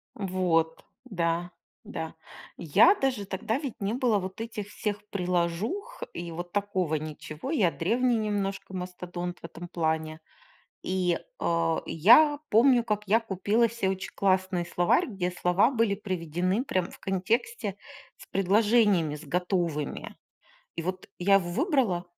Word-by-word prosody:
Вот, 180 -4 0 0.2
да 175 -4 -1 0.3
да. 160 -1 -6 0.4
Я 315 - +5
даже 255 - -1
тогда 205 +5 -2
ведь 275 -6 -5
не 200 +2 -1
было 245 -3 +2
вот 190 +2 -5
этих 215 -3 -5
всех 210 0 -4
приложух 180 - -2
и 170 0 -6
вот 175 +2 -6
такого 190 -5 0
ничего. 155 - -6
Я 210 - +3
древний 235 +10 +1
немножко 200 -3 -2
мастодонт 180 -1 -5
в - - -25
этом 170 +1 -8
плане. 160 -2 -1 0.6
И, 180 -2 0 0.2
э, 165 -1 +1
я 290 - +6
помню, 240 +2 +5
как 210 -1 -1
я 225 - +5
купила 220 +2 +1
се 225 -4 -1
очень 190 0 -4
классный 185 -2 +1
словарь, 175 0 +2
где 185 -5 -2
слова 180 +5 +3
были 230 -6 +1
приведены 185 - -1
прям 185 -9 -1
в - - -14
контексте 205 - -1 0.4
с - - -13
предложениями 200 -4 +3
с 150 +2 -10
готовыми. 175 -2 -2 0.6
И 165 - -3
вот 185 +2 -4
я 195 +2 +5
его 180 -3 +2
выбрала 240 - +1
190 Hz, 140 wpm, -28 LUFS, 175-220 Hz, 0.6 s, я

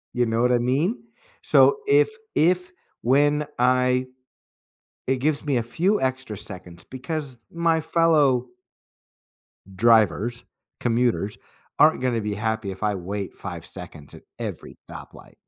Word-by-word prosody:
You 125 - +2
know 115 0 0
what 125 0 +3
I 120 - +3
mean? 145 - 0 0.4
So 440 - +5
if 430 +1 +5 0.3
if 180 +3 +2 0.3
when 145 +4 +2
I 125 0 +2 1.0
it 130 - +2
gives 145 +3 -1
me 140 -3 0
a 115 - 0
few 180 - 0
extra 130 -5 -2
seconds 90 -4 -10
because 130 0 -6
my 165 -1 +1
fellow 150 -6 +2 1.3
drivers, 115 +2 +2 0.4
commuters, 120 -3 0 0.4
aren't 150 -3 +5
gonna 120 -3 0
be 105 -1 -3
happy 110 -1 -2
if 95 - -9
I 105 -1 +1
wait 100 +2 -5
5 - - -8
seconds 70 -1 -11
at - - -13 0.2
every - - -7
stoplight. - - -12
125 Hz, 130 wpm, -24 LUFS, 110-150 Hz, 1.3 s, So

